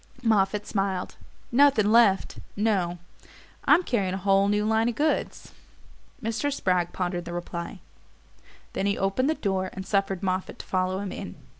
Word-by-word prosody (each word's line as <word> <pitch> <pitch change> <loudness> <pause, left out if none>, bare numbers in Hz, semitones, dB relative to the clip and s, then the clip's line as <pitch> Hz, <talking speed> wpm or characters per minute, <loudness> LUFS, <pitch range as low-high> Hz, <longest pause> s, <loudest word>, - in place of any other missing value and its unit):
Moffatt 210 -2 +2
smiled. 195 -3 -2 0.4
"Nothing 240 -5 +4
LEFT 225 -4 +4 0.2
no; 195 -5 0 0.7
I'm 360 - +5
carrying 200 - 0
a - - -2
whole 195 +1 +3
new 210 +1 +1
line 220 +1 +2
of 235 - -4
goods." 305 +1 -1 0.7
Mr. 230 +6 -1
Spragg 180 -9 0
pondered 175 -1 -3
the 175 - -6
reply; 175 +1 -6 0.9
then 195 - -1
he 200 - 0
opened 195 +9 +1
the 315 - +1
door 190 -5 -1
and 190 0 -6
suffered 195 -1 0
Moffatt 185 0 -2
to - - -9
follow 185 +1 -1
him 200 -2 -4
in. 195 - -7
195 Hz, 155 wpm, -26 LUFS, 185-220 Hz, 0.9 s, I'm